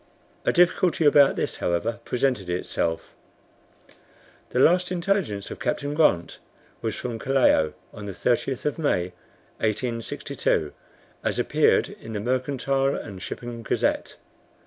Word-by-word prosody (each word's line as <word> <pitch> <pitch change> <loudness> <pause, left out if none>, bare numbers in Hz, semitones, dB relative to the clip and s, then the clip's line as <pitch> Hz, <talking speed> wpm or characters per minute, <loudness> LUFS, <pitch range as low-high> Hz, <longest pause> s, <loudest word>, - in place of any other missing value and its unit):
A - - +4
difficulty 175 -1 +3
about 145 -1 +6
this, - - -2
however, 110 +7 -1
presented 125 -7 0
itself. 85 -2 -2 1.4
The 125 - -1
last 180 +5 +4
intelligence 175 - -1
of - - -7
Captain 145 +3 -1
Grant 150 - +2 0.4
was 110 -2 -2
from 120 -1 -4
Callao 125 - +3 0.2
on 105 -1 -8
the - - -4
30th 120 +6 0
of 150 +2 -1
May, 90 - 0 0.5
1862, 110 - -1 0.5
as - - -1
appeared - - +3
in 115 - -10
the 105 - -2
Mercantile 135 +3 0
and 95 -3 -7
Shipping 120 +4 -6
Gazette. 115 - -1
120 Hz, 125 wpm, -25 LUFS, 100-140 Hz, 1.4 s, about